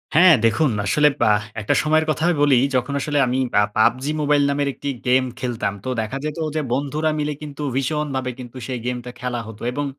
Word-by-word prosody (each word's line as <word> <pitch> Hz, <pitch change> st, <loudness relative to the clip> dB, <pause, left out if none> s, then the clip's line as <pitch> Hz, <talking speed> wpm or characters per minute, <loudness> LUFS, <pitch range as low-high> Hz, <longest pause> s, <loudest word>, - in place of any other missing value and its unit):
হ্যাঁ, 170 Hz, 0 st, +8 dB
দেখুন 115 Hz, +7 st, +3 dB, 0.2 s
আসলে 150 Hz, +8 st, +4 dB, 0.2 s
আহ, 105 Hz, 0 st, +2 dB, 0.2 s
একটা 105 Hz, -, +1 dB
সময়ের 155 Hz, +1 st, +2 dB
কথা 155 Hz, -, -1 dB
আমি 175 Hz, -, +2 dB
বলি, 140 Hz, -3 st, +5 dB, 0.2 s
যখন 130 Hz, +3 st, 0 dB
আসলে 145 Hz, +1 st, -1 dB
আমি 125 Hz, +1 st, 0 dB, 0.2 s
আ -, -, +4 dB
"PUBG 125 Hz, +4 st, +3 dB, 0.2 s
MOBILE" 145 Hz, -1 st, +3 dB
নামের 140 Hz, 0 st, 0 dB
একটি 140 Hz, -, -5 dB, 0.2 s
গেম 130 Hz, +1 st, +4 dB, 0.2 s
খেলতাম। 120 Hz, -5 st, -2 dB
তো -, -, -2 dB
দেখা 110 Hz, +5 st, -4 dB
যেত 155 Hz, +1 st, -4 dB, 0.2 s
যে, 155 Hz, -, +1 dB
বন্ধুরা 150 Hz, +3 st, -1 dB
মিলে 150 Hz, 0 st, -1 dB
কিন্তু 150 Hz, -1 st, -8 dB
ভীষণভাবে 135 Hz, -1 st, -1 dB
কিন্তু 125 Hz, 0 st, -9 dB
সেই 125 Hz, -2 st, -3 dB
গেমটা 125 Hz, 0 st, -4 dB
খেলা 125 Hz, -1 st, -3 dB
হতো 110 Hz, -1 st, -11 dB
এবং 145 Hz, +3 st, -2 dB
135 Hz, 200 wpm, -21 LUFS, 125-150 Hz, 0.2 s, হ্যাঁ